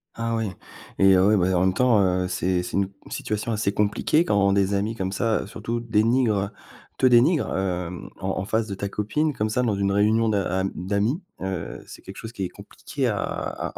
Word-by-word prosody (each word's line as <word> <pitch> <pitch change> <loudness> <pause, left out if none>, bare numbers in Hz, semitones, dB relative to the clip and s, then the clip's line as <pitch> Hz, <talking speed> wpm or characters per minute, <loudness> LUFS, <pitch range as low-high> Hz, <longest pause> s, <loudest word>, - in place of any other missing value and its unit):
Ah 115 0 -2
oui. 110 -3 -1 0.5
Et 95 -1 +6
heu, 95 +1 +4
ouais, 105 +1 +4
bah, 90 0 +2
en - - +2
même 95 0 +3
temps, 120 -1 +4
heu, 90 0 +1
c'est 90 -1 0
c'est 90 - -7
une 100 0 0 0.2
situation 110 +2 -3
assez 105 -2 0
compliquée 105 +11 +2
quand 100 -1 +3
des 100 0 +2
amis 100 +3 0
comme 95 -3 -3
ça, 115 +1 0
heu, - - -10
surtout 115 +3 -4
dénigrent, 115 0 +2
heu, 100 +1 -1 0.5
te - - +2
dénigrent, 130 +6 +4
hem, 90 -2 -3
en 95 0 -2
en - - -3
face 110 +2 0
de 100 - -4
ta 100 +1 -4
copine, 150 +11 0
comme 110 -6 -1
ça, 125 +3 0
dans 110 -5 +1
une 100 0 0
réunion 110 +3 +3
d'a 100 -4 0
am 95 +1 -1
d'amis, 100 - -1 0.2
heu, 95 -3 -4
c'est - - -11
quelque 95 - -11
chose 115 +1 -8
qui 100 - -4
est 90 - -2
compliqué - - -5
à - - -1
à - - -4
100 Hz, 220 wpm, -24 LUFS, 95-115 Hz, 0.5 s, Et